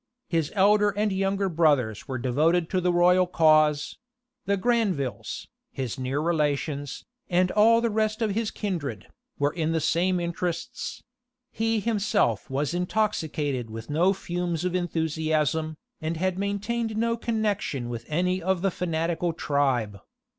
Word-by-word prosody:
His 165 -3 0
elder 205 +1 +5
and 205 +1 0
younger 195 +1 0
brothers 145 - +1
were 130 -2 -3
devoted 155 +8 +1
to 185 - +1
the 180 0 +2
royal 180 +1 +4
cause: 155 -3 +3 0.5
the 200 0 +2
Granvilles, 195 - -1 0.3
his 130 -1 -4
near 130 +2 -1
relations, 150 -3 -1 0.2
and 180 0 +2
all 230 +2 +5
the 235 -1 0
rest 215 +1 0
of 220 -3 0
his 220 +1 -1
kindred, 150 - -4 0.3
were 145 +1 +1
in 165 -1 -1
the 165 - +1
same 180 +3 +1
interests: 170 0 -4 0.5
he 225 0 0
himself 210 -5 +1
was 140 +4 -1
intoxicated 160 - -1
with 115 +4 -7
no 170 +6 +3
fumes 175 -3 -3
of 180 - -1
enthusiasm, 160 -2 0 0.2
and 160 +1 -2
had 185 +2 0
maintained 210 +3 -2
no 230 +1 +1
connections 210 - -1
with 120 -1 -5
any 180 +4 0
of 185 +1 0
the 195 - +2
fanatical 170 0 -1
tribe. 130 -10 0
175 Hz, 140 wpm, -26 LUFS, 150-200 Hz, 0.5 s, elder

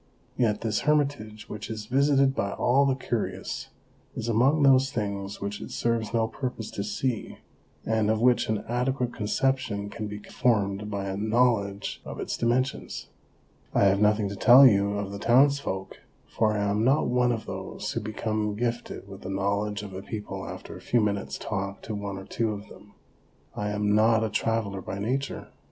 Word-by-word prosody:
Yet 110 -4 +1
this 110 -1 0
hermitage, 140 -8 0
which 105 0 -7
is 110 -1 -5
visited 135 +2 +3
by 100 -6 -1
all 135 +3 +3
the 135 - +2
curious, 120 -4 -3 0.5
is 110 - -4
among 130 +7 +3
those 135 0 +5
things 100 -2 -3
which 100 +1 -4
it - - -7
serves 115 -2 -1
no 115 -1 +1
purpose 125 -3 -5
to 100 - -3
see, 110 +3 -3 0.5
and 110 -1 +1
of 110 0 +2
which 120 -1 +3
an 110 -1 -1
adequate 125 +1 -1
conception 105 -2 -1
can 110 -2 -5
be 105 0 -6
formed 105 -2 0
by 100 -2 -3
a 95 -1 -3
knowledge 110 -2 +1
of - - -7
its - - -2
dimensions. 130 +3 -1 0.7
I - - +4
have 100 0 +4
nothing 105 0 +3
to 100 - -5
tell 125 +7 +8
you 100 -4 +4
of 100 -1 -3
the 100 - -6
townsfolk, 125 -5 +2 0.3
for 110 -1 +1
I 100 - 0
am 100 +2 +1
not 135 +5 +3
one 125 0 +2
of 115 -2 -3
those - - -5
who - - -2
become 110 0 -2
gifted 120 -2 -3
with 95 -1 -10
the 95 - -6
knowledge 100 +1 -1
of 100 -2 -8
a 95 - -5
people 95 -3 -6
after 90 +2 -8
a 90 - -10
few 120 - +2
minutes' 100 -2 -1
talk 100 -1 -4
to 110 - -5
one 100 -1 -4
or 95 - -8
two 110 +2 -1
of 100 0 -9
them. 100 0 -15 0.6
I 105 0 -2
am 105 0 +1
not 110 +1 +4
a 110 - -1
traveller 110 -4 -1
by 95 - -5
nature. 130 +7 -3
110 Hz, 185 wpm, -27 LUFS, 100-120 Hz, 0.7 s, tell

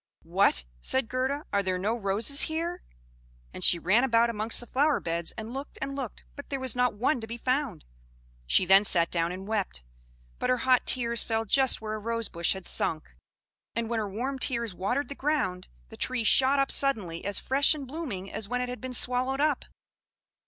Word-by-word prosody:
"What!" - - +2
said 260 - 0
Gerda. 260 +4 -2
"Are 200 - +3
there 185 -1 -1
no 205 +5 -1
roses 220 +6 +1
here?" 335 +3 -3 0.7
and - - -5
she - - +6
ran 190 +8 +3
about 235 -2 +3
amongst 220 0 +1
the 240 - -5
flowerbeds, 205 - 0
and 220 +1 -6
looked, 275 +2 -7
and 275 +1 -4
looked, 265 -6 -6
but 285 - -10
there 275 - -3
was 260 -3 0
not 250 -3 +1
one 250 +4 0
to 225 - -7
be 230 +1 -6
found. 255 - -2 0.6
She 185 - +4
then 195 +2 +6
sat 170 -4 +2
down 170 0 0
and 190 +2 -7
wept; 205 - -2 0.6
but - - -1
her 255 - +3
hot 255 0 +2
tears 235 -2 +2
fell 225 -1 -1
just 265 +4 +3
where 215 -1 -4
a 215 - -4
rose 230 0 -2
bush 170 0 0
had 190 -2 -9
sunk; 155 -1 +1 0.6
and 230 0 -2
when 230 - 0
her 210 -2 -3
warm 255 +7 -3
tears 235 -5 0
watered 245 +11 -1
the - - -6
ground, 275 -12 -1 0.2
the - - -12
tree 255 -2 0
shot 265 +5 +4
up 275 0 +1
suddenly 205 -12 0
as 200 +1 -2
fresh 275 +3 +3
and 285 -3 -6
blooming 255 - -6
as 210 -2 -4
when 250 0 -1
it 250 - -3
had 250 - -6
been 255 -1 -4
swallowed 255 +2 +2
up. 295 -2 +1
235 Hz, 200 wpm, -28 LUFS, 200-265 Hz, 0.7 s, she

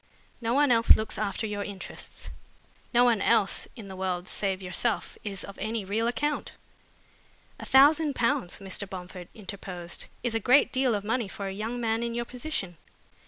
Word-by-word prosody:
No 230 +1 0
one 285 -1 +4
else 230 -1 +7
looks 220 -2 -2
after 215 +1 -1
your 205 -1 -2
interests. 200 -2 -7 0.6
No 245 0 +5
one 235 -4 +4
else 195 0 +2
in 220 -5 -9
the 190 - -8
world 185 -1 -2
save 195 -2 -1
yourself 195 +2 -1
is 200 -3 -4
of 200 - -10
any 220 0 -2
real 220 +4 0
account." 290 +5 -1 1.1
"A - - -6
thousand 290 +2 +6
pounds," 230 -7 0
Mr. 195 0 -5
Bomford 180 -2 -8
interposed, 190 -4 -6 0.2
"is 240 -2 0
a 225 - +1
great 255 +6 +5
deal 260 -3 +2
of 200 - -2
money 225 +1 0
for 200 +1 -6
a 195 - -3
young 220 +5 -3
man 225 -1 0
in 235 0 -2
your 240 0 -1
position." 240 - -4
215 Hz, 175 wpm, -28 LUFS, 195-240 Hz, 1.1 s, else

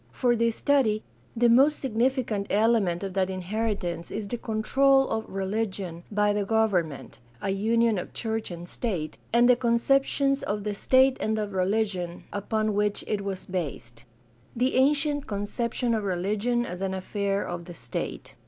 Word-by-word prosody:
For 240 - +2
this 230 0 +1
study 250 -7 +2 0.3
the 240 +1 +4
most 275 +6 +5
significant 235 -4 0
element 205 -5 +2
of 195 -1 -4
that 190 -1 +1
inheritance 185 -2 -3
is 210 -1 -4
the 240 - -3
control 270 +5 +3
of 220 0 -3
religion 190 -3 -3
by 210 0 +2
the 205 0 0
government 185 - 0
— 120 0 -29
a 195 - 0
union 225 +1 +2
of - - -7
church 225 -1 -3
and 175 -1 -7
state 180 -8 -4
— - - -33
and 240 +1 +5
the 250 - +6
concep 240 +3 +3
tions 275 -1 +1
of 205 0 -2
the 210 0 -2
state 260 +5 +4
and 220 0 0
of 210 -2 -3
religion 185 -2 -1
upon 215 +1 -1
which 205 0 0
it 210 -2 -1
was 195 -2 -4
based. 135 -10 -5 0.5
The 250 +3 +1
ancient 290 +2 +2
conception 230 +4 -1
of 220 -2 0
religion 205 +6 0
as 180 -3 -6
an 190 -1 -1
afifair 200 +1 -2
of 175 -1 -5
the 175 -1 -9
state. 120 -6 -5
210 Hz, 170 wpm, -27 LUFS, 190-235 Hz, 0.5 s, the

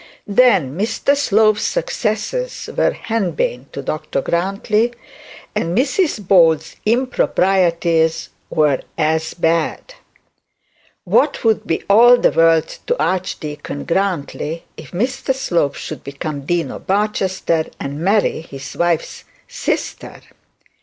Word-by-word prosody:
'Then 200 - +3
Mr 220 +8 +1
Slope's 215 -5 +3
successes - - -2
were - - +3
henbane 175 - -2
to 140 - -6
Dr 155 -1 -3
Grantly; 195 - 0 0.6
and 170 +4 -1
Mrs 270 - 0
Bold's 165 -5 +4
improprieties 180 -9 +1 0.2
were 150 -4 +2 0.2
as 160 0 0
bad. 165 - -1 1.1
What - - +2
would 225 -2 +1
be 165 - -1
all 240 +5 +7
the - - +3
world 165 -1 +2
to 485 - 0
Archdeacon 155 -6 -3
Grantly 170 -3 -2
if - - -11
Mr 250 +7 -1
Slope 170 - 0
should - - -7
become 140 +2 -5
the 140 - -13
Dean 175 -1 0
of - - -10
Barchester 190 -5 0
and 140 +1 -5
marry 195 0 +1
his 140 -4 -9
wife's 170 -2 -1 0.2
sister! - - -4
180 Hz, 110 wpm, -18 LUFS, 160-220 Hz, 1.1 s, all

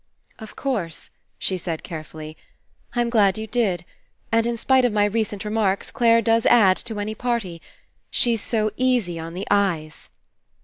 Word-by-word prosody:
''Of 220 -2 -10
course," 205 - -3 0.3
she 185 -1 -1
said 165 -2 -4
carefully, 155 -2 -8 0.6
'Tm 240 -1 +1
glad 205 -4 +4
you 220 - -4
did. 205 -7 0 0.5
And 230 +1 +3
in 235 0 -1
spite 260 +2 +3
of 245 - +3
my 205 -1 +3
recent 210 -1 -2
re 210 - -3
marks, 205 -3 0
Clare 230 -1 +4
does 225 0 +3
add 195 -6 +6
to 220 -3 -6
any 210 +1 -3
party. 220 -8 -3 0.5
She's 230 -3 +2
so 215 -1 0
easy 245 -10 +1
on 165 +1 -7
the 190 +3 -4
eyes." 175 -7 0
210 Hz, 165 wpm, -23 LUFS, 185-230 Hz, 0.6 s, add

